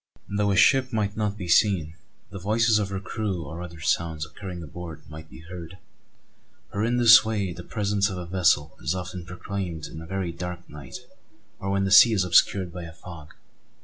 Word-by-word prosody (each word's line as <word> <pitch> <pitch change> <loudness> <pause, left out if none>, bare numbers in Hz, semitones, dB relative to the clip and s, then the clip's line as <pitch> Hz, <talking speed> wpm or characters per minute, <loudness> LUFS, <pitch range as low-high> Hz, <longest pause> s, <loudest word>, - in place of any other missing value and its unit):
Though 100 0 0
a 100 - +2
ship 130 +7 +4
might 105 -3 -1
not 105 -1 -2
be 90 -4 -6
seen, 85 -3 +3 0.4
the 100 - -7
voices 110 +3 +2
of 100 -2 -2
her 100 -1 -3
crew 100 -3 -3
or 80 +5 -7
other 85 -2 -9
sounds 80 0 -1
occurring 90 +1 -8
aboard 80 0 -9
might 80 0 -11
be 80 - -13
heard; 90 0 -9 0.9
for 100 - -2
in 120 +2 +1
this 115 -1 +8
way 105 -5 -2
the 90 - -9
presence 105 +1 0
of 95 - -5
a 90 - -5
vessel 85 -5 +1
is 75 +8 -1
often 90 -1 -6
proclaimed 90 -2 -5
in 80 - -9
a 80 - -10
very 95 -1 -3
dark 90 +1 -7
night 70 -2 -10 0.5
or 95 - -4
when 100 0 +1
the 95 - -1
sea 115 +3 +8
is 100 -3 +2
obscured 90 0 +3
by 90 - -6
a 80 - -10
fog. 85 -3 -12
90 Hz, 200 wpm, -25 LUFS, 85-100 Hz, 0.9 s, this